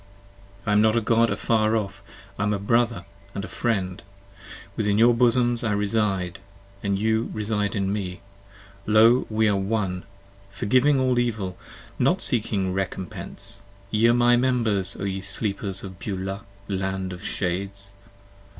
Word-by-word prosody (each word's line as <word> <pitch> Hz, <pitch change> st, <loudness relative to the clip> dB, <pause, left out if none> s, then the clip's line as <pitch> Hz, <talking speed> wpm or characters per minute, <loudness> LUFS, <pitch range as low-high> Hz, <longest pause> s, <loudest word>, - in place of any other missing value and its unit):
I 105 Hz, -, 0 dB
am 105 Hz, 0 st, +5 dB
not 110 Hz, +1 st, +4 dB
a -, -, +5 dB
God 115 Hz, +1 st, +3 dB
afar 110 Hz, -1 st, +1 dB
off, 100 Hz, -3 st, -3 dB, 0.4 s
I -, -, 0 dB
am 105 Hz, 0 st, +1 dB
a -, -, -1 dB
brother 115 Hz, +3 st, +1 dB, 0.3 s
and 100 Hz, -, -4 dB
friend; 95 Hz, -6 st, -1 dB, 0.7 s
Within 105 Hz, -1 st, +1 dB
your 120 Hz, +2 st, +6 dB
bosoms 120 Hz, 0 st, +2 dB
I 110 Hz, -3 st, +1 dB
reside, 100 Hz, -3 st, 0 dB, 0.4 s
and 100 Hz, -1 st, 0 dB
you 110 Hz, +2 st, +1 dB
reside 105 Hz, -1 st, -1 dB
in 100 Hz, -1 st, 0 dB
me: 95 Hz, -3 st, -4 dB, 0.7 s
20 110 Hz, 0 st, +4 dB
Lo! 115 Hz, +3 st, +6 dB
we 110 Hz, 0 st, +2 dB
are 105 Hz, -, +3 dB
One; 95 Hz, -2 st, -1 dB, 0.5 s
forgiving 130 Hz, +7 st, +3 dB
all 130 Hz, -1 st, +2 dB
Evil; 105 Hz, -7 st, -1 dB, 0.4 s
Not 155 Hz, +9 st, +3 dB
seeking 105 Hz, -, 0 dB
recompense; 95 Hz, +1 st, -5 dB, 0.3 s
Ye 110 Hz, +2 st, +4 dB
are -, -, +6 dB
my 120 Hz, 0 st, +5 dB
members 115 Hz, -7 st, +1 dB
O -, -, -4 dB
ye 95 Hz, -1 st, -2 dB
sleepers 100 Hz, -1 st, -1 dB
of 95 Hz, -2 st, -9 dB
Beulah, 95 Hz, -3 st, -4 dB, 0.2 s
land 95 Hz, -1 st, -2 dB
of 90 Hz, -, -9 dB
shades! 100 Hz, +2 st, -2 dB
105 Hz, 150 wpm, -25 LUFS, 95-115 Hz, 0.7 s, your